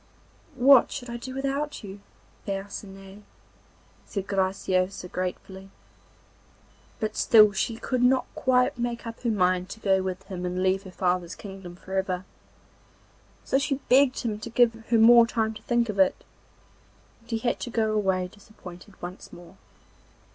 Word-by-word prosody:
'What 260 Hz, 0 st, +6 dB
should 245 Hz, -3 st, -6 dB
I 235 Hz, -, -4 dB
do 260 Hz, +2 st, -8 dB
without 275 Hz, +1 st, -3 dB
you, 200 Hz, 0 st, -9 dB, 0.5 s
Percinet?' 195 Hz, 0 st, -7 dB, 0.8 s
said 195 Hz, -2 st, -5 dB
Graciosa 190 Hz, -1 st, -1 dB
gratefully. 190 Hz, +1 st, -5 dB, 1.3 s
But 215 Hz, 0 st, -3 dB
still 215 Hz, -2 st, +6 dB
she 215 Hz, +3 st, -2 dB
could 250 Hz, +1 st, -2 dB
not 255 Hz, +1 st, +3 dB
quite 255 Hz, +1 st, +1 dB
make 235 Hz, 0 st, -3 dB
up 230 Hz, 0 st, -7 dB
her 240 Hz, -, -1 dB
mind 185 Hz, -3 st, +1 dB
to 215 Hz, -, -8 dB
go 195 Hz, -3 st, +2 dB
with 185 Hz, 0 st, -4 dB
him 185 Hz, -2 st, -7 dB
and 180 Hz, +1 st, -2 dB
leave 190 Hz, +1 st, +2 dB
her 190 Hz, -, -9 dB
father's 180 Hz, -2 st, -1 dB
kingdom 190 Hz, -3 st, -10 dB
for 190 Hz, +1 st, -11 dB
ever; 190 Hz, -1 st, -1 dB, 1.2 s
so 270 Hz, -, +1 dB
she 275 Hz, 0 st, 0 dB
begged 265 Hz, +1 st, +4 dB
him 220 Hz, -4 st, -3 dB
to 225 Hz, -, -7 dB
give 235 Hz, 0 st, +4 dB
her 225 Hz, +1 st, -1 dB
more 235 Hz, +1 st, +7 dB
time 220 Hz, -2 st, -1 dB
to 215 Hz, -, -11 dB
think 240 Hz, -1 st, +1 dB
of 205 Hz, -2 st, -4 dB
it, 190 Hz, -, +3 dB, 1.0 s
and 230 Hz, -, -26 dB
he 230 Hz, -, 0 dB
had 240 Hz, +2 st, -1 dB
to -, -, -5 dB
go 220 Hz, -2 st, 0 dB
away 190 Hz, -4 st, 0 dB
disappointed 190 Hz, -1 st, -14 dB
once 180 Hz, +1 st, -8 dB
more. 175 Hz, +1 st, -14 dB
205 Hz, 155 wpm, -26 LUFS, 190-235 Hz, 1.3 s, more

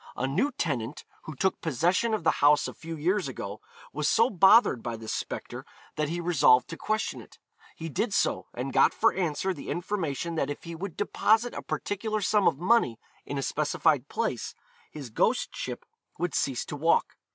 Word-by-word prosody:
A 130 Hz, -, -1 dB
new 185 Hz, -, +1 dB
tenant, 130 Hz, -4 st, -3 dB, 0.2 s
who 155 Hz, -, -7 dB
took 190 Hz, +8 st, 0 dB
possession 175 Hz, -, +1 dB
of 210 Hz, -, -5 dB
the -, -, +4 dB
house 145 Hz, +1 st, +5 dB
a -, -, -6 dB
few 165 Hz, 0 st, -8 dB
years 180 Hz, +3 st, 0 dB
ago, 105 Hz, -5 st, -6 dB, 0.3 s
was 150 Hz, +1 st, 0 dB
so 230 Hz, +3 st, +3 dB
bothered 190 Hz, -, +5 dB
by 115 Hz, 0 st, -4 dB
this 110 Hz, 0 st, -5 dB
spectre -, -, -5 dB, 0.3 s
that 150 Hz, -1 st, -1 dB
he 170 Hz, +2 st, -2 dB
resolved 145 Hz, -7 st, +4 dB
to 165 Hz, -, -5 dB
question 215 Hz, +5 st, -2 dB
it. -, -, -17 dB, 0.4 s
He 165 Hz, -, -6 dB
did 205 Hz, -, -1 dB
so -, -, 0 dB
and 130 Hz, +2 st, -4 dB
got -, -, +4 dB
for 225 Hz, -, +3 dB
answer 185 Hz, +1 st, -1 dB
the 145 Hz, -, -9 dB
information 170 Hz, -3 st, -2 dB
that 145 Hz, -4 st, -1 dB
if 145 Hz, -, -6 dB
he 170 Hz, -, -7 dB
would 180 Hz, +1 st, -6 dB
deposit 225 Hz, +3 st, +2 dB
a -, -, -5 dB
particular 215 Hz, +2 st, -3 dB
sum 205 Hz, 0 st, +2 dB
of 155 Hz, -, +2 dB
money 180 Hz, -, +2 dB, 0.3 s
in 145 Hz, -, -3 dB
a 135 Hz, -, -2 dB
specified 150 Hz, -2 st, +1 dB
place, 220 Hz, -, -2 dB, 0.3 s
his 140 Hz, -6 st, -9 dB
ghostship -, -, -1 dB, 0.3 s
would 175 Hz, 0 st, -2 dB
cease 135 Hz, -3 st, -1 dB
to -, -, -6 dB
walk. 160 Hz, +3 st, +1 dB
165 Hz, 185 wpm, -28 LUFS, 140-195 Hz, 0.4 s, house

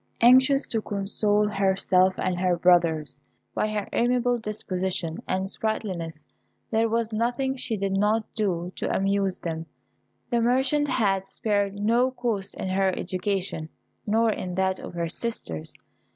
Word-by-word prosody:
Anxious 260 Hz, +3 st, +6 dB
to 225 Hz, -, -1 dB
console 205 Hz, +1 st, 0 dB
herself 190 Hz, -2 st, +2 dB
and 185 Hz, -, 0 dB
her 180 Hz, -1 st, +2 dB
brothers, 160 Hz, -6 st, +2 dB, 0.3 s
by -, -, 0 dB
her 210 Hz, -2 st, -2 dB
amiable 245 Hz, 0 st, +2 dB
disposition 185 Hz, -6 st, -2 dB
and 190 Hz, +1 st, -1 dB
sprightliness, 180 Hz, -8 st, -3 dB, 0.5 s
there 225 Hz, 0 st, +2 dB
was 230 Hz, 0 st, -1 dB
nothing 245 Hz, +4 st, 0 dB
she 230 Hz, -4 st, -3 dB
did 195 Hz, 0 st, -1 dB
not 210 Hz, +3 st, +2 dB
do 180 Hz, -5 st, -1 dB
to -, -, -2 dB
amuse 195 Hz, -1 st, +1 dB
them. 165 Hz, -1 st, -5 dB, 0.6 s
The 235 Hz, -1 st, +2 dB
merchant 265 Hz, +5 st, +2 dB
had 195 Hz, -7 st, +1 dB
spared 200 Hz, 0 st, -1 dB
no 230 Hz, +5 st, +2 dB
cost 225 Hz, -6 st, -3 dB
in 190 Hz, -, -4 dB
her 190 Hz, 0 st, +2 dB
education, 185 Hz, -3 st, -2 dB, 0.4 s
nor 225 Hz, +2 st, +3 dB
in 180 Hz, -3 st, -4 dB
that 190 Hz, 0 st, +1 dB
of -, -, -8 dB
her 170 Hz, -1 st, -1 dB
sisters. 160 Hz, -, -4 dB
200 Hz, 140 wpm, -26 LUFS, 185-230 Hz, 0.6 s, Anxious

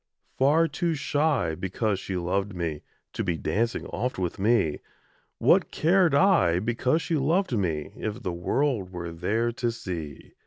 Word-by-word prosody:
Far 150 Hz, +5 st, +4 dB
too 170 Hz, 0 st, -1 dB
shy, 145 Hz, -, +1 dB
because 95 Hz, +4 st, -1 dB
she 95 Hz, -1 st, -4 dB
loved 95 Hz, +3 st, -1 dB
me, 80 Hz, -4 st, -3 dB, 0.3 s
To -, -, -2 dB
be 85 Hz, -3 st, -1 dB
dancing 110 Hz, +10 st, -1 dB
oft 125 Hz, +8 st, -3 dB
with 90 Hz, -1 st, -3 dB
me; 105 Hz, -7 st, +2 dB, 0.6 s
What -, -, +4 dB
cared 175 Hz, -2 st, +3 dB
I, 140 Hz, -, +4 dB
because 120 Hz, -, 0 dB
she 165 Hz, -, 0 dB
loved 160 Hz, +2 st, +1 dB
me, 80 Hz, -8 st, -1 dB
If 105 Hz, -1 st, -5 dB
the 90 Hz, -, -2 dB
world 100 Hz, +2 st, -1 dB
were 85 Hz, -2 st, -5 dB
there 105 Hz, +8 st, 0 dB
to 120 Hz, 0 st, -1 dB
see? 85 Hz, -10 st, -7 dB
105 Hz, 155 wpm, -26 LUFS, 90-140 Hz, 0.6 s, Far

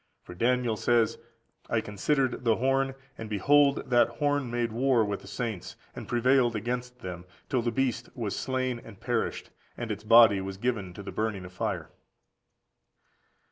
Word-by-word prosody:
For -, -, -10 dB
Daniel 120 Hz, +3 st, +1 dB
says: 115 Hz, -1 st, +2 dB, 0.5 s
"I -, -, +2 dB
considered 130 Hz, +6 st, -1 dB
the 115 Hz, -2 st, +3 dB
horn, 135 Hz, +2 st, +1 dB, 0.2 s
and 110 Hz, -1 st, -6 dB
behold 140 Hz, +7 st, +3 dB
that 120 Hz, -1 st, +5 dB
horn 145 Hz, -3 st, 0 dB
made 120 Hz, -1 st, -1 dB
war 120 Hz, -1 st, +2 dB
with 100 Hz, -1 st, -3 dB
the -, -, -14 dB
saints, 105 Hz, -2 st, -4 dB, 0.2 s
and -, -, -7 dB
prevailed 120 Hz, 0 st, +3 dB
against 125 Hz, +3 st, -4 dB
them, 90 Hz, -1 st, -6 dB, 0.3 s
till 130 Hz, -, +1 dB
the 120 Hz, -, 0 dB
beast 125 Hz, +1 st, -1 dB
was 110 Hz, -6 st, -3 dB
slain 130 Hz, -2 st, -2 dB
and 105 Hz, -4 st, -13 dB
perished, -, -, -2 dB, 0.3 s
and 120 Hz, -2 st, -4 dB
its 105 Hz, 0 st, -5 dB
body 110 Hz, -3 st, +7 dB
was 95 Hz, 0 st, -6 dB
given 105 Hz, -5 st, -2 dB
to 100 Hz, -, -8 dB
the -, -, -6 dB
burning 110 Hz, -4 st, -2 dB
of 90 Hz, -, -11 dB
fire." 95 Hz, -, -3 dB
120 Hz, 165 wpm, -28 LUFS, 105-125 Hz, 0.5 s, body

